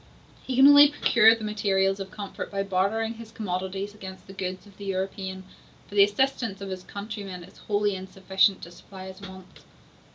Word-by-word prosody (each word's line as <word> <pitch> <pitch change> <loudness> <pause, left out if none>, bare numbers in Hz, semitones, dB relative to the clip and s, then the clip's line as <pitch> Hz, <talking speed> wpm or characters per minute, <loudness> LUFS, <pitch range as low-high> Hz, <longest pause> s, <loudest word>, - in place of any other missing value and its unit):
He 260 - -4
can 265 +2 +7
only 285 0 +9
procure 230 -6 +5
the 225 - -9
materials 195 -2 +1
of 195 0 -6
comfort 200 0 -7
by 195 -1 -1
bartering 200 +4 0
his 225 -1 -11
commodities 195 -1 -4
against 190 -2 -10
the 195 - -12
goods 185 0 -5
of 200 -2 -17
the 200 - -9
European, 190 0 -4 0.4
for - - -15
the 200 -1 +7
assistance 225 -1 0
of 195 -1 -6
his 185 -1 -5
countrymen 200 -2 -7
is 180 - -16
wholly 205 -1 0
insufficient 190 +1 0
to 170 - -9
supply 190 +2 -12
his 190 +1 -12
wants. 190 -1 -12
195 Hz, 185 wpm, -26 LUFS, 190-210 Hz, 0.4 s, only